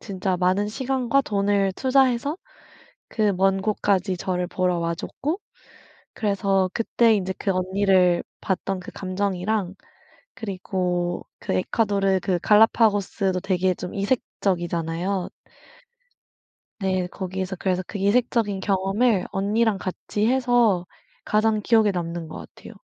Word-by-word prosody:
진짜 190 -2 -2
많은 185 +3 +1
시간과 260 +3 0
돈을 200 -2 +1
투자해서 265 +2 +2 0.7
그 215 -2 +1
먼 195 +1 +2
곳까지 195 -3 0
저를 180 0 -2
보러 180 -1 0
와 170 0 -1
줬고 300 - -4 0.8
그래서 200 -3 +1
그때 230 0 +3
인제 190 -1 -2
그 200 - -1
언니를 185 -1 +2 0.2
봤던 190 0 -2
그 - - -9
감정이랑 190 0 -2 0.6
그리고 180 -4 -2
그 - - -2
에콰도르 195 - +1
그 180 -2 0
갈라파고스도 205 -3 +3
되게 185 -1 +1
좀 180 - -7
이색적이잖아요. 180 -4 -1 1.5
네. 185 -2 0
거기에서 190 +1 -4
그래서 185 0 -1
그 205 - -6
이색적인 205 -1 +1
경험을 195 +2 +1
언니랑 205 +2 +1
같이 195 +3 -3
해서 245 -7 +3 0.4
가장 215 0 +1
기억에 220 -1 +4
남는 170 -2 -4
것 - - -8 0.2
같아요. - - -12
195 Hz, 270 characters per minute, -24 LUFS, 185-215 Hz, 1.5 s, 기억에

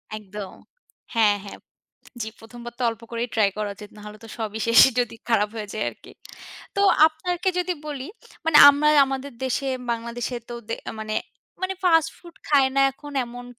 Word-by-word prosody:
একদম, 205 -2 -8 0.6
হ্যাঁ, 210 -3 +4
হ্যাঁ। 200 - -9 0.7
জি, 220 - -4
১ম 230 +2 -12
বার 240 - -8
তো - - -4
অল্প 225 0 -10
করেই 235 +1 -3
ট্রাই 215 -3 +4
করা 210 -1 -2
উচিত, 205 +1 -12
নাহলে 210 0 -10
তো - - -11
সবই 220 -1 -4
শেষ, 230 0 +7 0.2
যদি 240 -2 0
খারাপ 215 -3 +2
হয়ে 210 -2 -5
যায় 215 - -2
আরকি। - - -17 0.7
তো - - +1 0.3
আপনারকে 350 +3 -2
যদি 360 0 0
বলি, 280 -3 -5 0.4
মানে 325 -2 +4
আমরা 285 +1 +4 0.2
আমাদের 270 +1 -5
দেশে, 270 +1 -1 0.2
বাংলাদেশেতো 235 +1 -4
দে 230 - -1 0.3
মানে, 215 0 -4 0.5
মানে 375 +1 -1
ফাস্ট 325 -2 +4
ফুড 345 -2 -15
খায় 280 -3 +4
না - - +5
এখন 290 +2 -11
এমন 245 +1 -10
240 Hz, 170 wpm, -24 LUFS, 215-285 Hz, 0.7 s, শেষ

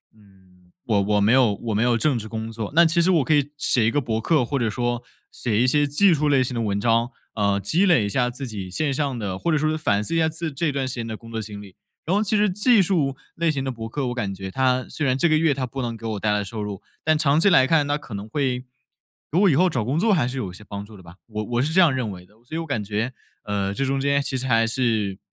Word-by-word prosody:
嗯， 95 -3 -24
我 105 -4 +2
我 105 +1 +1
没 105 +3 +3
有 125 -6 +4
我 115 +2 -4
没 105 - +1
有 120 0 +3
正 150 +3 +2
职 110 - -7
工 110 0 -5
作， 110 -2 -5
那 170 +1 +7
其 165 +1 +2
实 175 - +3
我 170 -6 +3
可 145 - +1
以 145 -1 +1
写 120 -6 +2
一 - - +4
个 145 - +1
博 115 -4 -2
客 150 -3 +2
或 140 +3 -2
者 115 -2 0
说 120 +2 -2 0.3
写 115 -4 -1
一 - - +3
些 145 +3 +3
技 175 +7 +4
术 150 -1 +1
类 135 -2 +4
型 125 0 -4
的 115 - -1
文 100 -2 -1
章， 115 +2 +1 0.2
呃， 100 -2 +1
积 160 - +1
累 175 - +4
一 - - -2
下 125 +4 +1
自 130 +2 -6
己 100 -5 -6
线 150 +8 -1
上 135 -3 -2
的 95 -4 -3
或 170 - -1
者 155 - +3
说 155 +1 0
反 105 -10 +1
思 165 - -3
一 - - +2
下 160 -1 +3
自 160 +1 -4
这 150 +2 0
段 135 -1 -2
时 130 - -4
间 115 -2 -4
的 110 -1 -5
工 115 - -14
作 115 -1 -3
经 105 -1 -8
历。 95 -3 -14 0.3
然 180 - +1
后 210 - +2
其 215 +1 0
实 210 0 +3
技 210 +4 +4
术 160 -8 +1 0.2
类 165 -1 +1
型 140 -3 -3
的 135 - -2
博 115 -2 -6
客， 135 +2 -3
我 120 - -2
感 105 -6 -2
觉 95 0 -7
它 130 +3 +1
虽 155 - -3
然 130 -1 +2
这 170 - +3
个 155 - +4
月 160 -2 +3
它 130 -2 -3
不 135 +2 -5
能 120 -1 -3
给 115 - -11
我 110 -2 -3
带 105 +1 0
来 105 0 0
收 105 +1 -5
入， 100 -2 -6 0.2
但 155 0 +3
长 145 -1 +2
期 200 - +5
来 130 -8 +5
看 155 -1 +3
它 145 0 0
可 125 -7 -9
能 100 +1 -6
会 125 0 -2 0.6
如 165 - +1
果 200 - +5
以 160 - +4
后 180 +5 +4
找 125 -9 -2
工 135 +7 0
作 220 +4 +2
还 150 -11 +2
是 130 +2 -5
有 105 -8 -3
一 - - -12
些 105 - -13
帮 100 -1 -6
助 105 0 -13
的 95 - -15
吧， 85 +1 -14
我 105 -1 -4
我 120 +2 -1
是 150 +4 -1
这 180 - +3
样 170 -6 +5
认 125 -4 -2
为 90 -2 -9
的， 100 - -26
所 140 +6 -8
以 - - -1
我 165 - -3
感 140 -9 -2
觉， 110 +5 -2 0.3
呃， 100 -1 -2
这 135 - -1
中 135 0 -1
间 140 0 +2
其 135 - -3
实 130 0 -2
还 115 -2 +3
是 110 -5 -1
125 Hz, 325 characters per minute, -23 LUFS, 105-150 Hz, 0.6 s, 那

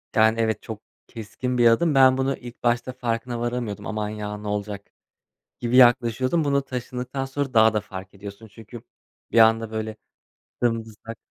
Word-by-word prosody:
Yani 110 +1 +4
evet 110 -1 0
çok 110 -1 -8 0.3
keskin 125 +3 -5
bir 120 -1 +5
adım. 145 +7 +3
Ben 130 -1 +6
bunu 135 +1 0
ilk 120 -1 -12
başta 120 +1 0
farkına 120 -1 -3
varamıyordum. 120 -3 -3
Aman 105 -1 -3
ya 105 -1 -5
ne 105 - -8
olacak 105 -1 -4 0.7
gibi 120 +1 0
yaklaşıyordum. 130 +5 +4
Bunu 140 -1 +1
taşındıktan 125 +1 -5
sonra 135 0 -4
daha 110 -1 +5
da 105 - +1
fark 95 0 -10
ediyorsun 100 +2 -10
çünkü 115 +2 -12 0.5
bir - - +3
anda 115 0 +5
böyle, 110 0 -4 0.7
dımdızlak. 115 -1 -3
115 Hz, 160 wpm, -24 LUFS, 110-125 Hz, 0.7 s, Ben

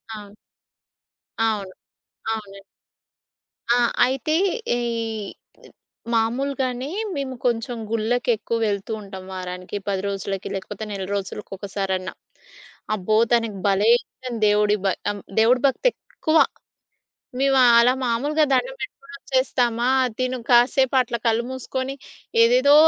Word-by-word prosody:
ఆ! 205 -1 -10 1.1
అవును, 210 -4 0 0.6
అవునండి. 200 -3 -7 1.1
ఆ! - - +3 0.3
అయితే 265 +4 -1 0.4
ఈ - - -2 1.3
మాములుగానే 255 +3 0 0.3
మేము 270 -2 -3
కొంచెం 240 0 0
గుళ్ళకెక్కువ 230 0 0
వెళ్తుంటాం. 200 -2 -4
వారానికి, 180 +1 -5
10 195 -1 0
రోజులకి, 195 -1 -3
లేకపోతే 195 +3 -6
నెల 195 -2 -4
రోజులకి 200 +1 -5
ఒకసారన్నా. 190 -1 -3 0.8
అబ్బో! 215 +2 +1 0.2
తనకు 230 -4 +1
భలే 200 +2 +3
ఇష్టం 255 -2 -9
దేవుడి 210 0 +3
భ - - +4 0.2
ఆహ్, 205 -1 -7 0.2
దేవుడి 240 +3 +4
భక్తెక్కువ. 320 - 0 1.0
మేము 270 0 +3 0.2
అలా 245 +2 +5
మాములుగా 290 +7 +1
దండం - - +1
పెట్టుకొని 275 0 -8
వచ్చేస్తామా, 250 -3 0 0.3
తిను 255 0 0
కాసేపు 250 +2 +4
అట్లా 235 -1 -3
కళ్ళు 230 +1 +2
మూసుకొని 260 +1 -4 0.5
ఏదేదో 255 +5 +5
230 Hz, 100 wpm, -23 LUFS, 205-260 Hz, 1.3 s, అలా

